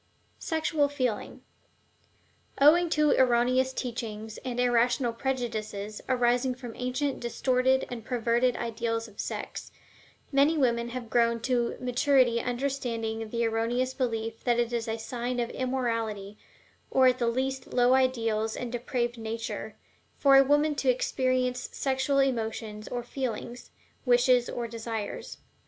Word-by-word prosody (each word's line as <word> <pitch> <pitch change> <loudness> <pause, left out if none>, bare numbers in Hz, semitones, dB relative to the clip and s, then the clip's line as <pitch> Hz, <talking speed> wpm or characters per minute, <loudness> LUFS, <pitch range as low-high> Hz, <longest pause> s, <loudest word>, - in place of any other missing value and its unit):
SEXUAL 315 -2 0
FEELING. 255 -6 -3 1.2
Owing 330 +5 +6
to 300 -1 +3
erroneous 255 +1 +3
teachings, 225 -4 -5
and 250 -2 -4
irrational 245 0 +2
prejudices 220 -5 -3
arising 250 0 +2
from 245 -2 -8
ancient 255 +3 -2
distorted 255 +2 +1
and 240 -2 -7
perverted 240 +1 +1
ideals 230 0 -2
of 210 -2 -18
sex, - - -5 0.6
many 285 +3 +4
women 235 -4 +1
have 240 -2 -6
grown 235 -1 +3
to 240 -1 0
maturity 250 -1 +3
under 250 +3 -1
the 230 -3 -2
erroneous 235 +3 0
belief 225 -3 -3
that 240 -1 +2
it 240 0 0
is 235 0 -1
a 225 0 -2
sign 245 +2 -3
of 235 -1 -1
immorality, 230 -6 -2 0.5
or 260 - +4
at 255 0 +3
least 260 +2 -1
low 245 0 +4
ideals 225 -4 +1
and 245 -2 -4
depraved 240 -1 -2
nature, 225 +1 -5 0.4
for 275 -1 +5
a 270 - +8
woman 295 +2 +3
to 275 -2 0
experience 255 0 0
sexual 270 +1 0
emotions 225 -5 -1
or 245 -1 -4
feelings, 245 -1 -5 0.4
wishes 245 0 +4
or 240 -1 -3
desires. 225 -2 -5
245 Hz, 130 wpm, -28 LUFS, 230-260 Hz, 1.2 s, a